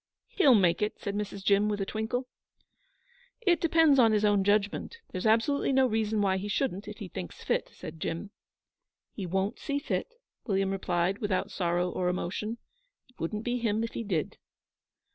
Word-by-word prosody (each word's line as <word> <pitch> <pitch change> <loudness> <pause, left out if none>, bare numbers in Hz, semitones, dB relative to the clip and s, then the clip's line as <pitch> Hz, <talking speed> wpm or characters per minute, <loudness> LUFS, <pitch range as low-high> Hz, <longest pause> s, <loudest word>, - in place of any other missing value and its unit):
'He'll 340 - +5
make 180 -4 +3
it,' 210 - -1
said 200 - -3
Mrs. 205 -1 -4
Jim, 200 +1 +3
with 205 -1 -1
a 195 - -1
twinkle. 220 +5 -2 1.1
'It 355 -7 +3
depends 320 -4 +5
on 225 -3 +6
his 210 0 +3
own 205 -2 +3
judgment. 205 - 0
There's 185 +3 -1
absolutely 230 +7 +2
no 265 0 +4
reason 220 -2 0
why 190 -1 +2
he 195 +2 -4
shouldn't, 205 -2 -1
if 210 0 -7
he 205 - -7
thinks 90 - -8
fit,' - - 0
said 160 +1 -9
Jim. 170 +6 -4 0.8
'He 195 -4 -5
won't 190 +5 -1
see 285 -2 -2
fit,' 475 +11 -3 0.3
William 195 -2 +1
replied, 185 0 0
without 205 -4 -1
sorrow 175 -1 0
or 180 0 -1
emotion. 205 +5 -3 0.5
'It 250 - -28
wouldn't 210 +7 -3
be 245 +1 -1
him 225 -1 0
if 230 - -4
he - - -3
did.' 180 -8 -2
210 Hz, 180 wpm, -29 LUFS, 190-230 Hz, 1.1 s, on